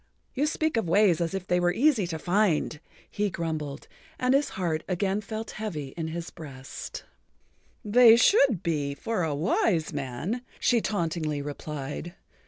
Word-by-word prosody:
"You 285 +3 +1
speak 315 -3 0
of 190 -7 0
ways 180 -2 +4
as 170 +2 -1
if 190 -2 -4
they 180 -1 +2
were 175 0 +3
easy 235 - +3
to 165 -2 -3
find," 175 -3 +1 0.3
he 205 0 -1
grumbled, 155 -5 -4 0.3
and 255 +1 +2
his 280 +2 +3
heart 165 -4 -1
again 195 +2 0
felt 220 +2 -5
heavy 155 -11 -4
in 160 +3 -5
his 165 +1 -5
breast. 135 -4 -8 0.8
"They 230 +2 +8
should 245 - +4
be—for 155 +6 -1
a 160 -3 0
wise 165 +1 +1
man," 145 - -3 0.2
she 235 -2 +3
tauntingly 160 -7 -1
replied. 145 +3 -6
175 Hz, 150 wpm, -27 LUFS, 155-215 Hz, 0.8 s, They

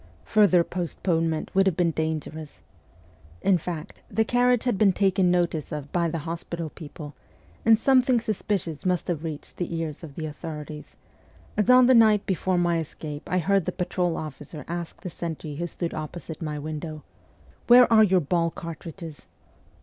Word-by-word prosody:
Further 185 - +4
postponement 165 -2 -2
would 195 0 +4
have 185 - +1
been 175 -2 +2
dangerous. 155 -1 -4 0.8
In 190 -3 +4
fact, 165 -1 -6
the 220 +3 +1
carriage 245 0 +3
had 245 -4 +1
been 200 -3 +5
taken 190 -1 +2
notice 175 -4 0
of 145 -2 -5
by 170 -1 +1
the 165 - -3
hospital 165 -1 -5
people, 150 -2 -9 0.5
and 225 -1 +7
something 255 0 +4
suspicious 205 -7 -2
must 180 -2 0
have 165 -3 -2
reached 155 -3 -7
the 175 -1 -3
ears 160 -1 -4
of 145 -4 -9
the 160 - -4
authorities, 150 0 -7 0.6
as 210 +3 +1
on 250 0 +8
the 260 - +6
night 220 -4 +5
before 185 0 0
my 175 -1 +2
escape 150 -1 -7
I 185 - +2
heard 195 +1 +2
the - - -1
patrol 180 -1 -1
officer 150 0 -7
ask 170 0 -5
the 180 - -5
sentry 155 -3 -5
who 170 +2 -2
stood 170 0 -4
opposite 160 +1 -6
my 150 -2 -3
window, 155 +1 -6 0.3
' - - -29
Where 245 +1 +9
are 220 -1 +8
your 190 -3 +4
ball 170 +2 +1
cartridges 165 -1 -9
170 Hz, 170 wpm, -25 LUFS, 155-195 Hz, 0.8 s, Where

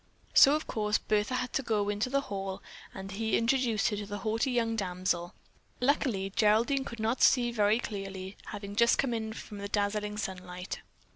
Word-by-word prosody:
So 280 +2 +8
of 310 - -2
course 210 -1 0
Bertha 215 +4 0
had 255 0 -2
to - - +1
go 215 -5 0
into 205 +4 -1
the 275 +1 +1
hall 195 -5 -5 0.3
and 195 0 -8
he 220 +2 0
introduced 235 -3 +2
her 210 - -3
to 205 -1 -5
the 205 0 -4
haughty 220 +6 0
young 230 -2 +1
damsel. 180 -3 -2 0.4
Luckily, 250 -7 +1
Geraldine 230 +7 +3
could 235 - -7
not 225 +3 0
see 240 -2 +5
very 210 -1 +3
clearly, 195 -4 -5
having 205 -1 -6
just 235 +2 +4
come 265 -3 +1
in 220 -1 -3
from 210 -1 -8
the 200 - -4
dazzling 210 0 -1
sunlight. 185 -2 -5
210 Hz, 185 wpm, -30 LUFS, 200-235 Hz, 0.4 s, So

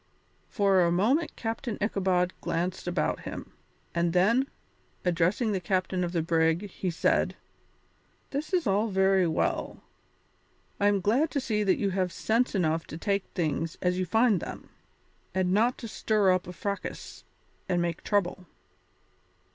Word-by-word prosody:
For 195 -3 +3
a 170 -1 +3
moment 235 - +1
Captain 230 0 -3
Ichabod 185 -3 +1
glanced 175 +2 -2
about 175 -3 0
him, - - -8 0.4
and 170 0 +1
then, 230 +9 +3 0.6
addressing 180 +6 +2
the 195 - 0
captain 185 +1 0
of 175 - -2
the 170 -3 0
brig, 165 +3 +1
he 185 - -3
said: 170 - +1 1.0
"This 290 +5 -3
is 365 -3 +1
all 205 +3 +2
very 190 -2 +3
well. 160 - -1 1.0
I 205 - +3
am 200 -1 +2
glad 245 - +2
to 285 - -1
see 215 -5 0
that 195 -2 +3
you 200 -2 0
have 185 -1 0
sense 225 +6 0
enough 165 -3 0
to 160 - -7
take 200 +2 0
things 165 -2 -1
as 180 0 0
you 185 - -1
find 220 0 +3
them, - - -8 0.7
and 185 -1 +1
not 230 +5 +3
to 230 - -7
stir 210 -3 +2
up 185 -1 0
a - - -5
fracas 200 +3 -5 0.5
and 175 - +2
make 170 -1 -2
trouble. 185 -3 0
190 Hz, 155 wpm, -28 LUFS, 175-210 Hz, 1.0 s, For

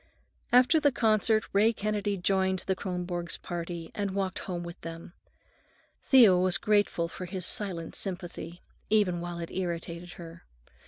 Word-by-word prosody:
After 250 +6 +6
the 290 -1 +3
concert 220 -2 +2
Ray 215 +3 +4
Kennedy 205 -1 -1
joined 190 0 +1
the 190 - 0
Kronborgs' 180 -2 -3
party 170 -1 -5
and 200 -2 -3
walked 195 -2 -1
home 175 -2 -4
with 170 +1 -9
them. 165 +1 -8 0.9
Thea 235 -9 +7
was 185 +1 +3
grateful 205 -5 +1
for 185 +2 -7
his 180 -1 -4
silent 180 -6 -3
sympathy, 175 -2 -5 0.3
even 195 -5 +2
while 175 0 -5
it 170 -1 -6
irritated 175 -1 -4
her. 170 0 -11
185 Hz, 145 wpm, -29 LUFS, 175-205 Hz, 0.9 s, Thea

